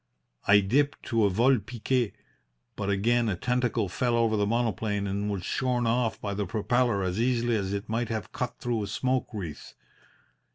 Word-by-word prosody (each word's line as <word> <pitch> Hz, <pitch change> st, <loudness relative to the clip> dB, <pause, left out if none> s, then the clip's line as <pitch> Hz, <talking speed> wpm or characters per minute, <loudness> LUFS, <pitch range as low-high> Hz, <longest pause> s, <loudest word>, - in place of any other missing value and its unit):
I 100 Hz, +1 st, +7 dB
dipped 140 Hz, +9 st, +1 dB
to 115 Hz, -3 st, +3 dB
a -, -, +4 dB
vol 120 Hz, +6 st, +3 dB
pique, 120 Hz, 0 st, -1 dB, 0.6 s
but 100 Hz, -, -3 dB
again 115 Hz, +4 st, +2 dB
a 95 Hz, -, 0 dB
tentacle 125 Hz, 0 st, 0 dB
fell 120 Hz, +6 st, 0 dB
over 115 Hz, -2 st, +2 dB
the 105 Hz, -1 st, +1 dB
monoplane 110 Hz, -3 st, 0 dB
and 100 Hz, +1 st, -2 dB
was 100 Hz, -3 st, -3 dB
shorn 125 Hz, -2 st, 0 dB
off 115 Hz, 0 st, +1 dB
by 100 Hz, -1 st, -3 dB
the 100 Hz, 0 st, -2 dB
propeller 115 Hz, -1 st, +1 dB
as 95 Hz, +4 st, -1 dB
easily 120 Hz, -1 st, +1 dB
as 100 Hz, -3 st, -1 dB
it 100 Hz, 0 st, -3 dB
might 115 Hz, +1 st, -1 dB
have 110 Hz, -4 st, -4 dB
cut 125 Hz, -, -4 dB
through 120 Hz, -2 st, -1 dB
a 100 Hz, -, -3 dB
smoke 130 Hz, +5 st, 0 dB
wreath. 90 Hz, -9 st, -7 dB
115 Hz, 180 wpm, -28 LUFS, 100-120 Hz, 0.6 s, I